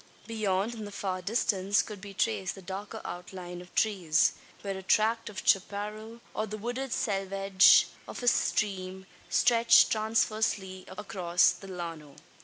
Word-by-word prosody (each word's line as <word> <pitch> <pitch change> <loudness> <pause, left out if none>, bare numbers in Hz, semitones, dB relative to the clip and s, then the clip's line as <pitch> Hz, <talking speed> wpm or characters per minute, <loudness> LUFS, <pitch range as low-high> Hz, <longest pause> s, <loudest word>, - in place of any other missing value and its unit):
Beyond, 215 -1 -1
in 220 -2 -7
the 205 - -8
far 190 -2 -3
distance, 200 -1 +1
could 210 -3 -9
be 200 -1 -10
traced 100 - -1
the 195 - -11
darker 195 +3 -6
outline 180 0 -7
of 180 - -15
trees 185 -8 +2 0.3
where 195 -1 -3
a 190 - -6
tract 220 +4 +1
of 205 - -8
chapparal, 210 +4 -1
or 215 - -2
the 215 +1 -6
wooded 245 +4 -4
selvedge 195 -2 +4 0.2
of - - -7
a - - -2
stream 190 -5 0 0.2
stretched 235 -1 +5
transversely 215 -3 0
across 185 -3 +1
the 195 - -10
llano. 165 -6 -7
195 Hz, 145 wpm, -29 LUFS, 185-215 Hz, 0.3 s, stretched